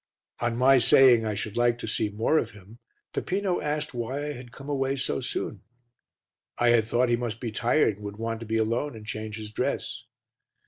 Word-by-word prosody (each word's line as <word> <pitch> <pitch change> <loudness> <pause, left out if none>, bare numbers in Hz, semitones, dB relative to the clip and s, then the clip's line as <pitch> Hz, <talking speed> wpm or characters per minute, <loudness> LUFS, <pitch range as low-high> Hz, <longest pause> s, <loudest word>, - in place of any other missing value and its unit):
On 120 -1 -1
my 130 +1 +6
saying 120 -2 +6
I 105 - -1
should 105 +1 -4
like 120 0 +2
to 115 - -6
see 105 0 +1
more 110 +10 +2
of 115 - -3
him, 105 +4 -16 0.3
Peppino 190 -1 -1
asked 150 -1 -2
why 120 +2 -3
I 150 - -3
had 125 -2 -10
come 135 +3 -11
away 135 -1 0
so 135 - -1
soon. - - -4 1.0
I 120 - +3
had 120 -2 +4
thought 120 +2 +2
he 120 - +4
must 120 -2 -4
be 120 -2 -4
tired 115 -1 +2
and 105 - -10
would 100 0 -6
want 115 0 -3
to 115 - -8
be 110 +1 0
alone 115 +5 -1
and 110 -1 -10
change 110 0 -5
his 105 -1 -7
dress. - - -3
120 Hz, 210 wpm, -27 LUFS, 110-130 Hz, 1.0 s, my